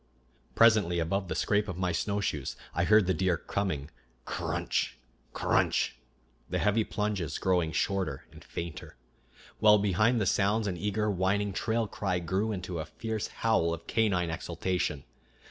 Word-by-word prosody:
Presently, 110 -7 +5
above 95 +4 -1
the 80 - -3
scrape 105 0 +1
of 95 - -5
my 90 -1 0
snowshoes, 95 -4 -2 0.2
I - - +1
heard 105 -2 +5
the 95 - +2
deer 90 0 +1
coming, 80 -6 -3 0.3
cr - - -4
r - - -1
runch! - - 0 0.4
cr - - -6
r - - +5
runch! - - 0 0.6
the - - -1
heavy 105 +2 +2
plunges 105 -6 -2
growing 90 -4 +1
shorter 95 -6 -1
and - - -14
fainter, 85 -5 -7 0.6
while 105 -1 +7
behind 105 +4 +2
the 105 - +1
sounds 105 +4 +2
an 95 -3 -1
eager, 105 +3 -1
whining 100 +2 0
trail 115 +3 0
cry 95 -3 -1
grew 95 +5 -1
into 90 -4 -4
a 80 - -3
fierce 110 +4 -4
howl 85 -7 +1
of 85 - -15
canine 95 -7 +1
exultation. 85 -3 -2
95 Hz, 165 wpm, -29 LUFS, 85-105 Hz, 0.6 s, while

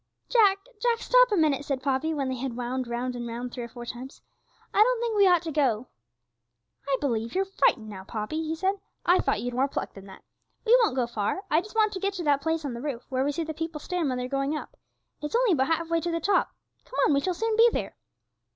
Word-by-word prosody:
'Jack, 415 -5 +5 0.2
Jack, 475 -1 +2
stop - - +4
a 410 - +2
minute!' 300 -4 +2
said 275 -2 -3
Poppy, 275 +3 0
when 285 -4 -1
they 260 0 -2
had 245 -1 -4
wound 250 +1 -2
round 245 +1 -3
and 240 -1 -5
round 240 +1 -5
three 245 - -5
or - - -8
four 240 0 -9
times; 250 +3 -8 0.5
'I 410 - +4
don't - - +4
think 465 -2 -1
we 400 -2 +6
ought 350 -2 +4
to 325 - -4
go.' 260 -6 +1 1.0
'I 275 -1 +2
believe 230 -3 -2
you're 385 +1 +2
frightened 385 - +1
now, 195 -3 -8
Poppy,' 215 +10 -4
he 320 0 -2
said; 385 +4 0 0.3
'I 355 +2 +5
thought - - 0
you'd 245 0 -3
more 260 +3 +2
pluck - - -4
than 195 0 -12
that! 190 - -13 0.4
We 470 +2 +7
won't 440 - +2
go 255 -2 +1
far. 235 - -2
I 315 +2 +4
just 425 +4 -13
want 430 -1 +3
to 380 - -4
get 395 +1 -1
to 355 - -4
that 285 -2 +2
place 320 0 -1
on 270 - -3
the 235 - -6
roof 270 -4 -4
where 260 -1 0
we 285 - +1
see 330 +3 -2
the 315 0 -5
people 325 0 -4
stand 345 -1 -2
when 255 - -1
they're 250 0 -3
going 275 +3 -1
up; - - -9 0.5
it's 300 +7 -3
only 485 -3 +4
about 265 -6 +2
half 330 +1 0
way 335 0 +1
to 345 - -2
the 335 0 -1
top; 390 +4 +2 0.3
come - - -9
on, 295 - +3
we 280 - +3
shall 365 +3 -1
soon 450 +4 0
be 460 +2 +7
there!' - - -3
295 Hz, 260 wpm, -27 LUFS, 250-375 Hz, 1.0 s, We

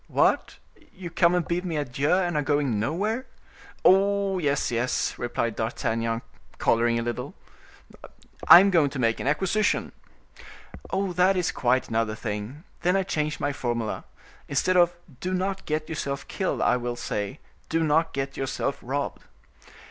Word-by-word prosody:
"What! - - +1 0.4
you 180 -2 -8
come 170 +1 +3
and 175 -2 0
bid 175 +1 -1
me 170 -4 -3
adieu, 145 0 -1
and 180 -2 +2
are 150 - +2
going 145 -7 0
nowhere?" 205 - -1 0.6
"Oh! 195 0 +4
yes, 145 -5 0
yes," 120 +2 0
replied 115 -2 -2
D'Artagnan, 115 0 -2 0.3
coloring 115 0 +2
a 115 - -1
little, 120 0 -4 1.1
"I 175 - +11
am 200 0 +3
going 160 -6 +4
to 140 - -7
make 115 -2 +1
an - - -3
acquisition." 190 +8 +1 1.0
"That 190 0 +2
is 180 -1 +1
quite 125 +1 +1
another 110 -1 0
thing. 110 +7 -5 0.2
Then 180 +2 +2
I 195 - +2
change 150 -4 -2
my 145 0 -1
formula. 120 -4 -3 0.4
Instead 165 +6 +1
of 175 -1 +5 0.3
'Do 185 +4 -2
not 190 +1 -2
get 155 0 -1
yourself 140 -3 -4
killed,' 190 - -2
I - - +3
will 120 0 -3
say,—'Do 120 +9 -4
not 160 +1 +2
get 135 0 -3
yourself 135 +1 -2
robbed. 140 +3 -4
150 Hz, 150 wpm, -26 LUFS, 120-180 Hz, 1.1 s, I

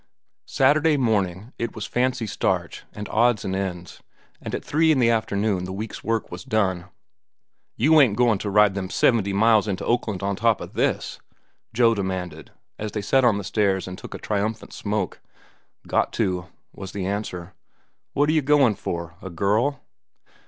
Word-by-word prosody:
Saturday 150 +3 +3
morning 105 -3 -1
it 115 0 -3
was 110 - -4
"fancy 125 -1 0
starch," 105 - -2
and 105 0 -7
odds 115 -1 +2
and 95 - -2
ends, 90 -3 -5 0.4
and - - -4
at - - -6
three 160 +2 +3
in 150 - +3
the 120 -2 +4
afternoon 105 -4 0
the 95 - -6
week's 105 +3 -6
work 115 0 -1
was 90 0 -7
done. 95 -5 0 0.9
"You 155 +6 +5
ain't 125 -7 +4
a - - -3
goin' 115 -3 +3
to 105 - -3
ride 105 0 +4
them 95 -2 -4
seventy 105 -4 +2
miles 110 +1 +4
into 95 -3 -3
Oakland 110 -5 -1
on 100 0 0
top 115 +1 +2
of - - -9
this?" - - -1 0.5
Joe 115 0 +4
demanded, 95 -5 -4 0.3
as 105 -1 -4
they 105 - -2
sat 135 +6 +3
on 115 -4 +4
the 100 - -4
stairs 95 0 0
and 90 - -6
took - - -9
a - - -4
triumphant 110 +2 -3
smoke. 105 0 -3 0.6
"Got - - +1
to," 90 -2 -1 0.3
was 95 -1 -8
the 100 -2 -3
answer. 95 -3 -4 0.6
"What 145 +1 +2
are 155 - +2
you 155 - +3
goin' 140 -4 +4
for?—a 85 0 -6
girl?" 105 - 0
105 Hz, 175 wpm, -24 LUFS, 95-120 Hz, 0.9 s, You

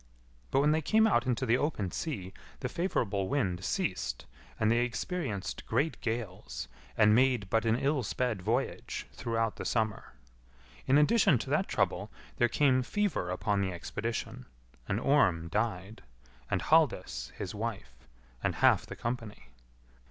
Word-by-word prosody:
But 135 - +3
when 150 +1 +4
they 160 +1 +2
came 220 +8 +4
out 130 - +2
into 130 +1 0
the 120 +1 +3
open 105 - -1
sea 100 - -4 0.3
the 125 - -2
favourable 115 - -1
wind 95 -11 0
ceased, - - -2 0.3
and 110 0 +3
they 120 - +3
experienced 125 - -3
great 145 +8 0
gales, 110 - -4 0.3
and 105 -1 +6
made 125 -5 +3
but 115 0 +2
an 110 0 +3
ill 140 +1 +1
sped 120 -3 -1
voyage 115 +8 -2
throughout 115 -1 -1
the - - -5
summer. 110 -2 -1 0.7
In 135 - +5
addition 150 - +5
to 130 +4 -5
that 155 +6 +2
trouble, 100 0 0 0.3
there 120 - +3
came 130 -2 +3
fever 160 - -1
upon 100 +2 0
the 95 -1 0
expedition, 115 +6 -4 0.4
and 100 - 0
Orm 95 - +3
died, 105 0 -2 0.5
and - - 0
Halldis, 60 +1 +2
his 90 - -5
wife, 105 - -4 0.5
and - - 0
half - - +4
the - - -7
company. 115 - -5
115 Hz, 150 wpm, -31 LUFS, 100-135 Hz, 0.7 s, and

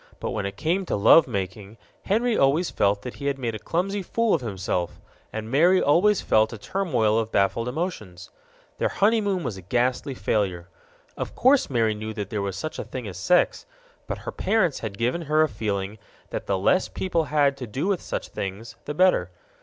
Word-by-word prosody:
But - - -3
when 100 - -2
it 100 - -8
came 175 +5 0
to - - 0
love 140 +10 +6
making, 100 0 -5 0.3
Henry 230 +3 +1
always 150 +4 +2
felt 100 0 +1
that 125 - -7
he 140 - -4
had 140 -1 0
made 120 -4 -3
a 110 - -5
clumsy 195 - -1
fool 230 +4 0
of 160 - +1
himself, 95 -5 -3 0.3
and 110 +1 -5
Mary 175 +7 +5
always 185 +7 +3
felt 110 0 +3
a 115 - -6
turmoil 120 - 0
of 110 0 -3
baffled 100 +4 +1
emotions. 125 - -5 0.5
Their - - +1
honeymoon 205 -4 +1
was 100 - -4
a - - -9
ghastly 125 +7 0
failure. 95 -4 -1 0.5
Of - - -5
course 265 +2 +4
Mary 115 -4 +2
knew 110 +1 -6
that 105 -3 -5
there 105 - -1
was 100 -1 -3
such 155 +9 -5
a - - -2
thing 125 -4 -6
as 90 -3 -7
sex, 180 - +2 0.4
but - - -3
her - - -3
parents 185 -10 +1
had 105 -3 -6
given 125 +10 0
her 155 0 +3
a - - +2
feeling 105 -3 -3 0.3
that - - -4
the 100 - +1
less 140 - +2
people 170 -4 -1
had 145 -2 +2
to 125 -3 -6
do 130 - -3
with 195 -3 0
such - - -5
things, 100 +4 -6
the 150 - -4
better. 180 - +3
125 Hz, 200 wpm, -25 LUFS, 100-170 Hz, 0.5 s, love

